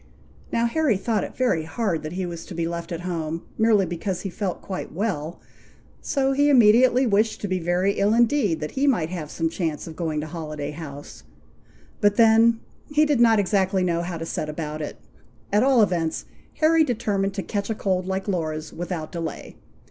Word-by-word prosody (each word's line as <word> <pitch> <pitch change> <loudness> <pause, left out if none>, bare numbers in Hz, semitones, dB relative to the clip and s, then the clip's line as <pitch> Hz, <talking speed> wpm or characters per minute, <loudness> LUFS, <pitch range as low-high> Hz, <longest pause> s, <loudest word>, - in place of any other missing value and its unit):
Now, 230 0 +1
Harry 245 -2 +2
thought 215 0 -1
it - - -8
very 245 -11 +2
hard 185 -2 -1
that 155 +1 -6
he 185 0 -2
was 170 -1 -6
to 180 - -8
be 165 0 -1
left 170 +1 -5
at 170 0 -4
home, 165 -2 -3
merely 220 -3 +3
because 175 +2 -3
he 195 - -5
felt 185 0 -3
quite 190 - -6
well, 170 -4 -3 0.6
so 270 -2 0
he 285 +2 +3
immediately 250 +1 +5
wished 215 0 +2
to 205 - -2
be 185 -1 -1
very 175 +3 +1
ill 200 +1 +3
indeed, 235 - +2
that 150 - -4
he 275 +2 0
might 175 - +2
have 165 -4 -5
some 165 +1 -1
chance 160 -2 -3
of 160 - -9
going 160 -2 -2
to 150 - -3
Holiday 155 -3 -5
House; 145 -2 -9 0.8
but 205 -1 +3
then 225 +1 +5 0.3
he 300 +1 +3
did 290 -4 +1
not 230 -2 +6
exactly 190 -1 +1
know 170 -2 0
how 170 0 -4
to 165 - -5
set 155 -1 -3
about 150 0 -5
it. 150 - -5 0.6
At 210 - +5
all 260 -3 +5
events, 170 -5 -1 0.4
Harry 320 +1 +5
determined 200 -7 -1
to 195 - -3
catch 205 0 -3
a 220 - -1
cold 185 -3 -1
like 190 +1 -2
Laura's, 160 -4 -3
without 175 -2 -5
delay. 165 -2 -6
185 Hz, 195 wpm, -24 LUFS, 165-225 Hz, 0.8 s, not